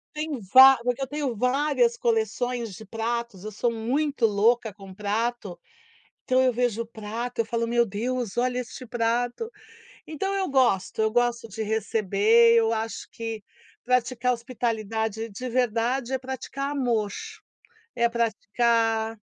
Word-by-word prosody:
Tenho 300 -4 -3
va 265 +1 +10
porque 245 +2 -1
eu 265 - -1
tenho 285 -4 -3
várias 295 - +2
coleções 250 - -1
de 220 - -10
pratos, 225 -2 -4
eu 215 - -5
sou 235 +3 0
muito 255 +4 0
louca 220 +1 +2
com 195 -2 -12
prato, 210 -1 -2 0.7
então 255 0 +3
eu 255 - +4
vejo 230 -1 -1
prato, 230 +2 -5
eu - - +2
falo: 230 +1 -1
“Meu 235 0 +3
Deus, 235 +2 -3
olha 250 0 +1
este 250 +1 -7
prato!”. 240 - -1 0.6
Então 350 +6 -3
eu 385 -1 -1
gosto, 240 -7 +2
eu 220 - +2
gosto 240 -1 0
de 220 +2 -5
receber, 220 +1 +3
eu 225 0 +3
acho 225 0 -4
que 225 -2 -6 0.4
praticar 250 0 +1
hospitalidade 225 -2 -3
de 250 +5 -6
verdade 245 +1 0
é 265 - +1
praticar 265 +2 -5
amor, 235 -7 0 0.9
é 235 0 +2
praticar 225 0 0
235 Hz, 140 wpm, -25 LUFS, 220-255 Hz, 0.9 s, va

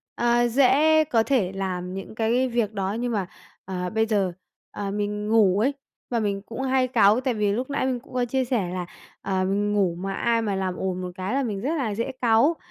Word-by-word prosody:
ờ, 240 0 +2
dễ 285 +6 +4
có 240 -7 +2
thể 225 -8 +1
làm 185 -2 -4
những 195 +2 -7
cái 235 +4 +1
việc 230 -3 0
đó. 195 -1 -2
Nhưng 245 0 -1
mà, 205 -4 -1 0.4
ờ, 180 -1 -3
bây 220 +2 +1
giờ, 205 -4 +1 0.4
ờ, 200 -1 -4
mình 210 0 -2
ngủ 205 -4 +4
ấy 260 +6 +2 0.4
và 235 - +1
mình 200 -2 -1
cũng 230 +3 -6
hay 260 -1 +2
cáu 220 -1 +4
tại 260 -1 0
vì 210 -2 +1
lúc 250 +6 -2
nãy 280 - -1
mình 255 -2 -1
cũng 255 - -18
có 250 -1 +1
chia 260 +2 0
sẻ 230 -8 -1
là, 180 -1 -3 0.4
ờ, 190 -1 -1
mình 205 +2 0
ngủ 190 -5 +1
mà 195 +3 -4
ai 230 +3 +1
mà 205 -3 -1
làm 190 -1 -2
ồn 185 0 -3
một 180 0 -5
cái 190 +4 -3
là 275 +1 +1
mình 205 -5 -3
rất 295 +8 -1
là 225 -8 -1
dễ 230 +5 -2
cáu. 240 +7 +4
220 Hz, 230 wpm, -24 LUFS, 195-245 Hz, 0.4 s, dễ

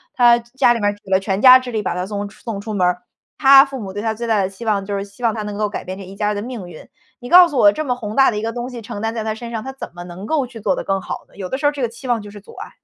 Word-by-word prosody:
他 240 -1 +5
家 240 +1 +2
里 235 - -3
面 205 -1 +2
儿 205 - -4
举 200 -1 -15
了 190 - +4
全 195 0 -2
家 255 +1 +9
之 255 -1 -8
力 215 -2 -2
把 - - -1
他 180 +1 -3
送 205 -1 -4
出 200 - -17
送 225 -4 -5
出 215 +2 -6
门 185 -3 +1
儿， 180 0 -2 0.3
他 275 -1 +8
父 275 -2 -7
母 195 -4 -7
对 205 - -4
他 220 0 -1
最 235 +2 -5
大 220 -3 +2
的 190 - -1
期 195 +4 -10
望 205 -3 +1
就 200 0 -3
是 195 - -3
希 200 +4 -18
望 230 -2 +2
他 215 - -4
能 210 0 -5
够 210 0 -1
改 200 - -5
变 185 +1 -6
这 - - -8
一 190 +1 -11
家 210 +1 -1
人 210 - -1
的 205 - -3
命 230 -5 -7
运。 165 -3 -13 0.3
你 245 - -9
告 355 +2 +9
诉 290 -6 -2
我 205 -3 +7
这 310 +8 -4
么 250 -2 0
宏 215 -3 -6
大 270 -2 +5
的 210 - -4
一 - - -5
个 225 +1 -2
东 240 +1 -5
西 240 -2 -7
承 210 -2 -7
担 225 0 -1
在 225 - -3
他 220 0 -2
身 235 +1 -8
上， 225 -2 -4
他 265 - -6
怎 270 - -9
么 175 - -8
能 175 +3 -9
够 285 0 0
去 235 -2 -11
做 200 -3 0
得 - - -4
更 195 0 -1
好 - - -7
呢？ - - -23
有 190 -2 -5
的 265 - -2
时 290 - -3
候 - - +5
儿 - - -3
这 285 -3 -5
个 - - +2
期 245 +3 -11
望 240 -2 +1
就 205 - -10
是 205 - -12
阻 - - -15
碍。 - - -8
220 Hz, 410 characters per minute, -19 LUFS, 200-245 Hz, 0.3 s, 家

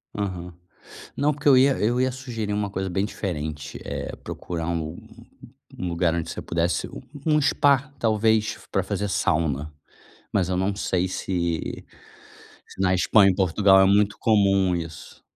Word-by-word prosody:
Aham. 90 -4 -4 0.6
Não, 145 +2 +1
porque 145 +1 -4
eu 135 -2 +7
ia 135 +1 +4
eu 120 +4 +1
ia 130 0 +1
sugerir 120 -5 -4
uma 105 -1 -1
coisa 95 -1 -3
bem 95 +3 0
diferente: 75 -8 -5
eh, - - -5
procurar 85 -2 -5
um 80 -1 -3 0.8
um 90 - -3
lugar 85 -1 +1
onde 85 -1 -3
você - - -5
pudesse 85 +1 -1
um - - -9 0.3
um 150 - +3
spa, 140 0 +2
talvez, 110 -1 +1
para - - +1
fazer 105 - -2
sauna, 75 -4 0 0.6
mas 95 -4 +1
eu 90 - 0
não 95 +2 0
sei 95 -2 0
se 85 -3 -3 0.8
se - - -12
na 95 -1 +3
Espanha 100 +3 +5
e - - 0
Portugal 95 +1 +4
é 95 - +6
muito 100 +1 +3
comum 100 -4 +3
isso. 80 -5 -8
95 Hz, 160 wpm, -24 LUFS, 85-110 Hz, 0.8 s, eu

